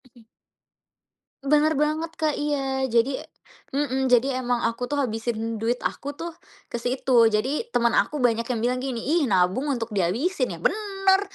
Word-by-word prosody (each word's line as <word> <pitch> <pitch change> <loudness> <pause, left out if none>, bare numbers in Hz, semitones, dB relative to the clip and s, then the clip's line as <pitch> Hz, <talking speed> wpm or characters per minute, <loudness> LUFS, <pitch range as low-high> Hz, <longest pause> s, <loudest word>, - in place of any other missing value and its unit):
Mhm. 230 - -18 1.2
Benar 300 +2 +3
banget, 305 +3 0
Kak, 310 -2 0
iya. 270 -3 -1
Jadi 240 +3 +1 0.6
mhm, 265 -2 0
jadi 255 +1 +3
emang 245 -1 -1
aku 230 +2 -1
tuh 290 - -2
habisin 225 -1 -3
duit 235 +2 0
aku 285 +1 -3
tuh 335 +2 -5 0.4
ke - - -2
situ. 245 -1 +3
Jadi, 260 - 0
teman 235 0 +3
aku 300 - +1
banyak 230 -1 +2
yang 245 -3 -1
bilang 250 +1 +1
gini, 255 -4 -3 0.2
"Ih 305 - +1
nabung 190 +7 +2
untuk 235 -4 -2
dihabisin" 230 - 0
Ya - - -12
benar, 390 -2 +2
255 Hz, 160 wpm, -24 LUFS, 230-295 Hz, 1.2 s, Benar